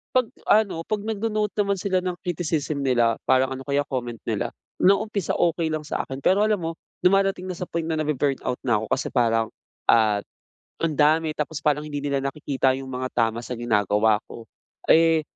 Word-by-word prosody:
kapag 250 -3 +2 0.2
ano, 200 -6 +3
kapag 210 -1 -2
nagno-note 215 -1 -1
naman 200 0 0
sila 185 -1 +1
ng 180 -1 -2
criticism 155 -4 -2
nila, 120 -3 +3
parang 130 0 +3
ano 135 - -8
kaya 140 0 +1
comment 120 -3 -3
nila. - - -1 0.3
Noong 200 +3 +3
umpisa, 200 -5 -1
okey 170 -1 +1
lang 155 -1 -2
sa 150 - -2
akin. 135 0 -6
Pero, 190 +2 +4
alam 215 -2 +2
mo 165 - -1 0.3
dumarating 195 0 +2
na 185 - -4
sa 180 - -5
point 170 -1 -2
na 160 -1 -1
nabu 155 0 0
burn 140 +1 +1
out 125 - +1
na 120 -5 +2
ako. 110 - -4
Kasi, 135 - -3
parang, 115 -3 +2 0.4
ah, 110 -3 +4 0.6
ang 165 -2 +1
dami, 155 +1 +3
tapos, 150 +1 -3
parang 150 -1 +2
hindi 145 -1 -4
nila 140 -1 0
nakikita 135 -2 0
iyung 135 - -7
mga 130 0 -3
tama 115 0 +1
sa 125 - -5
ginagawa 105 -1 +2
ko. 115 - -10 0.4
Eh, 165 -1 +5
150 Hz, 195 wpm, -24 LUFS, 125-180 Hz, 0.6 s, Eh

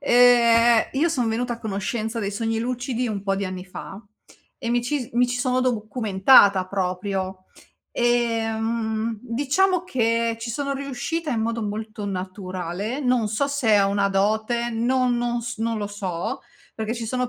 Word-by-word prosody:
ehm, 240 -3 +5
io 300 +6 +2
son 250 -8 0
venuta 240 +2 -1
a 230 - -13
conoscenza 220 +2 -3
dei 200 -2 -2
sogni 225 +1 -1
lucidi 245 +1 -2
un 205 -3 -3
po' 195 -1 0
di 200 - -2
anni 185 -1 -5
fa, 195 +2 -9 0.6
e 235 - -4
mi 240 0 +1
ci 290 +3 -1
si 235 - -11
mi 245 +1 +3
ci 245 0 -2
sono 255 0 +1
documentata, 210 -4 +4
proprio. 185 0 -3 0.5
Ehm, 225 -1 0
diciamo 295 +10 +1
che 230 -6 0
ci 230 +1 -4
sono 280 +4 -2
riuscita 280 +4 -3
in 235 -4 0
modo 230 0 -1
molto 215 0 -5
naturale, 185 +3 -4
non 250 -5 +1
so 220 +7 0
se 245 -8 +3
ho 195 - +3
una 200 0 +1
dote, 220 +4 0
non 245 +2 +1
non 240 0 -1
s 235 -1 -6
non 225 0 -1
lo 205 - -2
so. 205 +2 -4 0.3
Perché 220 +1 -3
ci 230 -1 -5
sono 250 +1 -1
230 Hz, 165 wpm, -23 LUFS, 205-245 Hz, 0.6 s, ehm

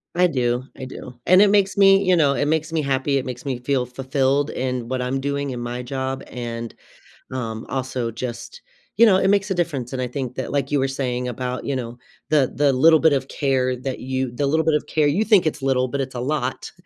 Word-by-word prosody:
I 180 0 +4
do, 125 -4 0
I 130 - -7
do. 125 -1 -10
And 185 +2 +6
it 205 - +6
makes 200 -1 +2
me, 195 0 +6
you 185 -1 +4
know, 140 -3 +4
it 145 - 0
makes 160 +1 -1
me 160 - +1
happy, 140 0 0
it 130 - -2
makes 125 +1 -7
me 130 -3 -2
feel 125 0 0
fulfilled 135 +3 0
in 125 -2 -3
what 130 -1 -1
I'm 130 +2 -2
doing 140 0 -2
in 125 - -5
my 120 +1 -4
job 130 +1 -3
and, 115 -1 -5 0.6
um, 115 -4 -4
also 130 -3 -2
just, 120 - -7 0.4
you 235 - +7
know, 190 -4 +5
it 190 - +2
makes 200 0 +2
a - - +3
difference, 140 -8 -2
and 130 -1 -3
I 125 - -1
think 125 -1 -5
that 130 - -4
like 140 -1 -1
you 145 - +2
were 135 - +1
saying 125 -2 -2
about, 125 +1 -4
you 140 - -1
know, 120 -1 -5 0.3
the 145 -4 +3
the 145 -1 +3
little 160 +5 +5
bit 160 -2 +5
of 135 -1 0
care 130 -3 0
that 130 +1 -5
you 130 -1 -2
the 140 +3 -1
little 160 +3 +2
bit 160 - +3
of 150 - 0
care, 155 -1 +1
you 185 +10 +2
think 210 -6 +5
it's 150 -2 -1
little, 130 -2 +1
but 140 - -3
it's 130 -1 -4
a - - -3
lot 150 +3 -2
135 Hz, 240 wpm, -22 LUFS, 125-150 Hz, 0.6 s, you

